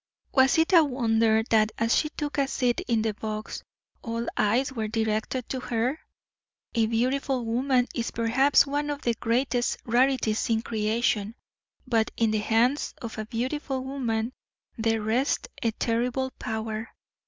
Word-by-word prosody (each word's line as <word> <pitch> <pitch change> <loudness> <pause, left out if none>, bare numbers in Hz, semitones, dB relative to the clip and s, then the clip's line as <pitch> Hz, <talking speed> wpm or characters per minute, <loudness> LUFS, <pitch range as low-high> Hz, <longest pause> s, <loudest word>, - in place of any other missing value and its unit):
Was 265 +3 +5
it 325 +3 +2
a 335 -2 +8
wonder 225 -5 +2
that 215 -1 +3
as 230 +1 +2
she 305 - +1
took 295 -1 -4
a 275 - +2
seat 250 -3 0
in 230 -2 +1
the 220 -1 0
box, 215 +1 -5 0.4
all 230 0 -3
eyes 245 +6 +1
were 220 -4 -2
directed 220 +3 -1
to 260 - -2
her? 250 +4 -1 0.7
A 225 -2 +2
beautiful 255 +2 0
woman 250 +2 +1
is 235 -2 -2
perhaps 250 +6 +3
one 290 +1 -2
of 290 0 -4
the 235 - +2
greatest 245 +2 0
rarities 245 -2 +2
in 225 0 +1
creation, 220 -1 0 0.5
but 230 -3 +1
in 225 -2 +2
the 215 - +1
hands 235 +6 +1
of 225 -2 -6
a 215 - -4
beautiful 260 +3 -3
woman 245 -3 -2 0.4
there 225 -1 0
rests 240 +6 0
a 230 - +2
terrible 245 +4 -1
power. 220 +1 -4
235 Hz, 155 wpm, -26 LUFS, 225-265 Hz, 0.7 s, a